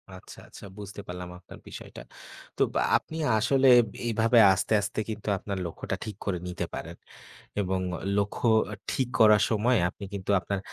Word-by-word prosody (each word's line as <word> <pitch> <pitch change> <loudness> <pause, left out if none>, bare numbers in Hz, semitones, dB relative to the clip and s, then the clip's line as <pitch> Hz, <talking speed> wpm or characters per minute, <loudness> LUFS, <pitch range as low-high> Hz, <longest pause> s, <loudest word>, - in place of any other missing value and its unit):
আচ্ছা, 95 - -13
আচ্ছা - - -12
বুঝতে 100 0 -8
পারলাম 90 0 -6
আপনার 90 - -14
বিষয়টা। - - -10 0.6
তো - - -3 0.4
আপনি 160 - -9 0.2
আসলে 135 +4 +3 0.4
এই 120 - 0
ভাবে 115 +1 +5
আস্তে, 95 +4 -1
আস্তে 105 +1 -4
কিন্তু 110 -1 -6
আপনার 100 +1 -5
লক্ষ্যটা 85 - -4
ঠিক 110 - -6
করে 95 -3 -1
নিতে 90 0 -3
পারেন - - -6 0.7
এবং 95 -1 -1 0.4
লক্ষ্য 105 +4 0 0.4
ঠিক 130 - 0
করার 105 -1 +7
সময়ে 115 +2 +2
আপনি 100 +1 -9
কিন্তু 100 0 -3
আপনার 100 +1 -3
105 Hz, 155 wpm, -27 LUFS, 95-110 Hz, 0.7 s, করার